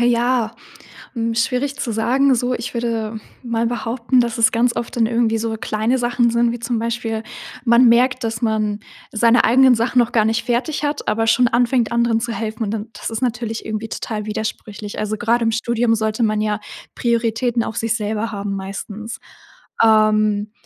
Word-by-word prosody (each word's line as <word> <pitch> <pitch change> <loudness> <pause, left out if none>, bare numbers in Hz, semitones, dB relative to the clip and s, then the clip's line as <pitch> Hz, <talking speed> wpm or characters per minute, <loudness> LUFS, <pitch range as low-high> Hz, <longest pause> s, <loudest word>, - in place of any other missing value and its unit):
Ja, 240 -1 +2 0.6
hm, 230 -1 -1
schwierig 255 +4 0
zu 235 - -2
sagen, 260 +5 +2
so 245 +1 -1
ich 235 +1 -5
würde 230 -2 -2 0.3
mal 230 -1 0
behaupten, 240 +2 0
dass 235 -1 -1
es 225 -1 +5
ganz 235 +1 +2
oft 235 - -4
dann 230 -2 +3
irgendwie 230 -1 +1
so 225 0 -2
kleine 220 +4 -1
Sachen 240 -1 +1
sind, 235 0 +2
wie 240 - -5
zum 235 0 -2
Beispiel.: 230 -1 -2 0.4
Man 235 +1 +6
merkt, 250 +2 +3
dass 225 0 -3
man 215 -2 0 0.3
seine 230 +2 +4
eigenen 255 +2 +6
Sachen 235 +2 0
noch 235 - +1
gar 220 -2 +3
nicht 225 +2 0
fertig 255 +6 -1
hat, 290 0 -2
aber 225 +1 +1
schon 245 +2 +4
anfängt, 240 0 +1
anderen 235 -1 +2
zu 235 0 -3
helfen. 225 0 -3
Und 205 - -3
dann 220 0 -4
das 210 - -6
ist 225 +2 -4
natürlich 235 -2 -2
irgendwie 220 0 -4
total 215 -1 -5
widersprüchlich. 210 -1 -5
Also, 215 0 -2
grad 235 +1 +1
im 225 0 +1
Studium 230 0 +1
sollte 220 +1 -1
man 215 -1 +1
ja 210 0 0 0.4
Prioritäten 235 0 0
auf 220 - -5
sich 225 0 0
selber 220 +1 -3
haben, 200 -1 -3
meistens. 205 +3 -6 0.6
Ähm, 215 -1 +3
230 Hz, 185 wpm, -20 LUFS, 220-240 Hz, 0.6 s, Man